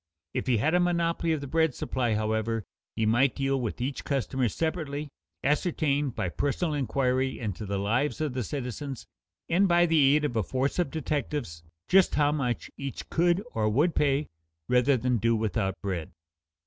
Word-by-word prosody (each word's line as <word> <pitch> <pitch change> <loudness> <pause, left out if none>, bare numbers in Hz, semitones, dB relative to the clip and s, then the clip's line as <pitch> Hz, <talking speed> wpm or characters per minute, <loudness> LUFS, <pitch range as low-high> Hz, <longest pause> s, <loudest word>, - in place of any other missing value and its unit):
If 130 - -2
he 125 -3 +3
had 155 +10 +1
a 180 - +4
monopoly 170 -1 +1
of 155 -3 0
the 140 - -5
bread 160 -1 +2
supply, 120 -4 -1
however, 110 0 -1 0.3
he 110 - 0
might 120 +4 +3
deal 135 -1 0
with 115 0 -3
each 130 +3 -3
customer 135 -3 0
separately, 155 -2 -3 0.3
ascertain, 150 -1 +1
by 95 -7 -3
personal 145 - -1
inquiry 130 -1 0
into 105 -2 -4
the 100 0 -1
lives 115 +11 0
of 155 -4 -1
the 125 -1 -2
citizens 135 +2 -5 0.4
and 190 +4 +3
by 175 -1 +5
the 150 -4 +5
aid 150 0 +2
of 125 - -2
a 110 - +2
force 130 - -1
of 175 - +1
detectives, 145 - -3 0.3
just 190 -1 +4
how 145 -1 +3
much 125 -6 -2
each 140 -1 -6
could 175 +3 +2
or 110 -1 +1
would 150 +10 +2
pay 145 0 +1 0.4
rather 125 +2 +4
than 125 +1 +1
do 115 +2 +2
without 105 -3 -1
bread. 90 -5 -3
135 Hz, 175 wpm, -28 LUFS, 115-150 Hz, 0.4 s, by